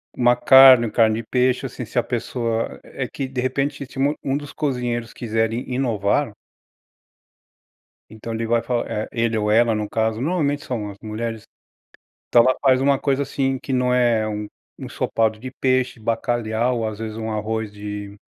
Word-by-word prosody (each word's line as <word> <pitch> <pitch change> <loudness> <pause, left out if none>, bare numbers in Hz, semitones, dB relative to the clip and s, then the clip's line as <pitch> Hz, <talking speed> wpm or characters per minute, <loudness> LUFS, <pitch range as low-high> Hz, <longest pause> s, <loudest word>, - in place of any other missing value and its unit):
uma 120 0 +3
carne, 130 -3 +8
carne 110 -1 +3
de 110 - -18
peixe, 125 +1 +1
assim, 125 0 -6
se 120 +3 -1
a - - 0
pessoa 115 -1 -3
é - - -6
que, 135 - -4
de 130 -1 -3
repente, 135 +2 -2
se 135 +1 -10 0.2
um 135 +1 0
dos 145 -1 -8
cozinheiros 125 -5 -2
quiserem 115 +2 -2
inovar. 120 0 0 1.8
Então 110 +1 -7
ele 115 0 -3
vai 115 0 +2
falar 120 -2 -2
eh, 105 - -2
ele 115 -2 0
ou 105 0 0
ela 115 0 +4
no 105 -1 -2
caso, 110 0 0
normalmente 145 -1 -1
são 110 -5 -3
as 100 - -10
mulheres, 110 0 -5 0.9
então 120 - +6
ela 130 - +3
faz 130 -2 +4
um 140 0 +3
coisa, 140 0 0
assim, 135 -1 -1
que 135 - -6
não 125 0 +1
é 120 -3 +2
um 105 0 -4 0.3
ensopado 110 -1 -1
de 130 0 -6
peixe, 130 -2 0
bacalhau 115 +1 -1
ou 110 -1 -1
às 105 -1 -7
vezes 110 -1 -5
um 110 -1 -4
arroz 110 0 -3
de 105 0 -7
120 Hz, 175 wpm, -22 LUFS, 110-130 Hz, 1.8 s, carne